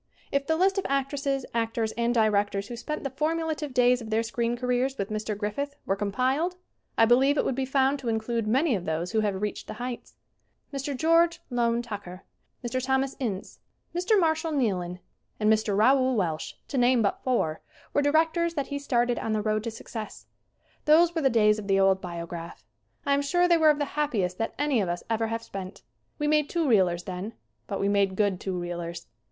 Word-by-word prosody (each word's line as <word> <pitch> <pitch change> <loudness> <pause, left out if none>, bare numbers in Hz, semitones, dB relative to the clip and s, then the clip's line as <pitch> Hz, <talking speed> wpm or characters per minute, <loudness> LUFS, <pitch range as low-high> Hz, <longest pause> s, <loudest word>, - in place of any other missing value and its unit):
If 280 0 0
the 320 - +2
list 380 +3 +2
of - - -4
actresses, 275 0 -1
actors 225 -1 -1
and 235 +1 0
directors 205 -3 +1
who 240 - -5
spent 300 +6 -5
the 275 - -3
formulative 310 +1 -1
days 250 0 +3
of 225 - -8
their 220 +1 +1
screen 235 +1 -1
careers 250 +2 0
with 200 +1 -3
Mr. 215 -1 -3
Griffith 255 +8 -3
were 195 - +1
compiled 255 - 0 0.4
I 225 - +6
believe 265 +5 +4
it - - +2
would - - +1
be 265 +1 -2
found 270 +1 +2
to 250 -3 -3
include 225 0 -1
many 265 +6 +2
of 185 -5 -2
those 160 +3 -2
who 220 - +1
have 205 -3 0
reached 210 0 -4
the - - -6
heights. 245 0 -6 0.6
Mr. 275 0 -3
George 330 +3 +3
Loane 235 -1 +1
Tucker, 200 -5 -7 0.4
Mr. 255 +2 -2
Thomas 265 +1 0
Ince, 210 -8 -4 0.3
Mr. 365 +5 +2
Marshall 320 -1 +1
Neilan 185 -10 0 0.4
and 215 0 +4
Mr. 215 -2 0
Raoul 260 +3 +4
Walsh, 165 -7 -1 0.2
to 270 - -1
name 245 -1 +4
but 200 - 0
four, 195 -12 0 0.3
were 290 - +3
directors 325 +3 +2
that 280 -3 -2
he 285 -1 -3
started 245 -3 +1
on 220 - -2
the 215 - 0
road 215 0 0
to - - -1
success. 220 -1 -8 0.6
Those 330 +3 +5
were 325 - -1
the 270 - +4
days 215 -3 +4
of 205 - -7
the 195 -1 +3
old 195 0 +4
Biograph. 170 -1 -7 0.4
I 280 - +3
am 280 - +2
sure 350 +5 +2
they 345 - +5
were 315 -1 +5
of 300 - +4
the 290 - 0
happiest 225 -12 -1
that 225 - -2
any 285 -6 +2
of 185 - -1
us 175 0 -3
ever 225 0 +1
have 225 0 -3
spent. 195 -1 -8 0.3
We 295 - -1
made 300 -1 +2
two 335 -3 0
reelers 180 -7 +3
then. 185 +5 -5 0.3
But - - -3
we 200 - +1
made 200 -1 +2
good 200 -2 +1
two 190 -2 -3
reelers. 175 -1 -5
240 Hz, 205 wpm, -27 LUFS, 205-280 Hz, 0.6 s, I